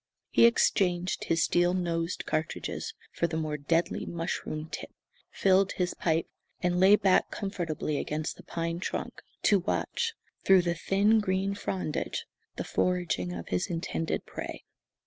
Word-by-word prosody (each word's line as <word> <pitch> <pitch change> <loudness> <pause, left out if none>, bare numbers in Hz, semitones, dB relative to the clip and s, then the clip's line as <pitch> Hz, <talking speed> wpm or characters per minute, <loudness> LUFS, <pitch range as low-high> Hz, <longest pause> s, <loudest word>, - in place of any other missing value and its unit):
He 235 - +7
exchanged 185 -5 +2
his 165 0 +2
steel 175 +1 +3
nosed 170 -1 -1
cartridges 155 0 -3 0.2
for 170 - 0
the 160 -1 -3
more 155 -1 -1
deadly 165 +4 0
mushroom 165 -2 -3
tipped, - - -7 0.3
filled 195 0 +3
his 180 -1 -1
pipe, 165 -1 0 0.3
and 180 0 +1
lay 190 +3 +8
back 190 -3 +3
comfortably 170 -7 -2
against 155 +1 -3
the - - -12
pine 165 0 -3
trunk, - - -4 0.2
to 200 - +5
watch, 455 - -1 0.3
through 190 -2 +6
the 170 0 +1
thin 200 +6 +3
green 195 -1 0
frondage, 190 -5 -3 0.3
the - - -3
foraging 175 - 0
of 85 -1 -6
his 90 -1 0
intended 165 -1 -2
prey. - - -6
175 Hz, 145 wpm, -29 LUFS, 165-190 Hz, 0.3 s, lay